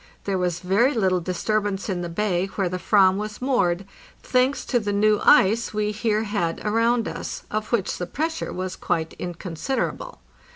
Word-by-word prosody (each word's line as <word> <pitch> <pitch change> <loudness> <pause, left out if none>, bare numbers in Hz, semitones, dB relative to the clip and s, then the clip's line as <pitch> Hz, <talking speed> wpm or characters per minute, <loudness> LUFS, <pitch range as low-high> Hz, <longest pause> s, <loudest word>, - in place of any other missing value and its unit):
There 195 -2 -1
was 175 -1 -1
very 205 +9 +2
little 190 -5 +2
disturbance 200 +3 -1
in 185 -3 -2
the 175 - -4
bay 185 0 0
where 195 -3 +1
the 180 0 -4
"ram 190 -2 +5
was 210 0 -5
moored, 195 -9 +1 0.4
thanks 255 +2 +1
to 245 - +1
the 205 -2 -2
new 210 +1 +3
ice 220 +3 +4
we 210 0 0
here 215 0 0
had 205 -6 -1
around 230 +2 +2
us, - - -5
of 215 0 -3
which 225 -6 0
the 180 - -3
pressure 320 - -3
was 185 0 -4
quite 160 -1 -2
inconsiderable. 180 - -4
205 Hz, 170 wpm, -24 LUFS, 180-225 Hz, 0.4 s, ram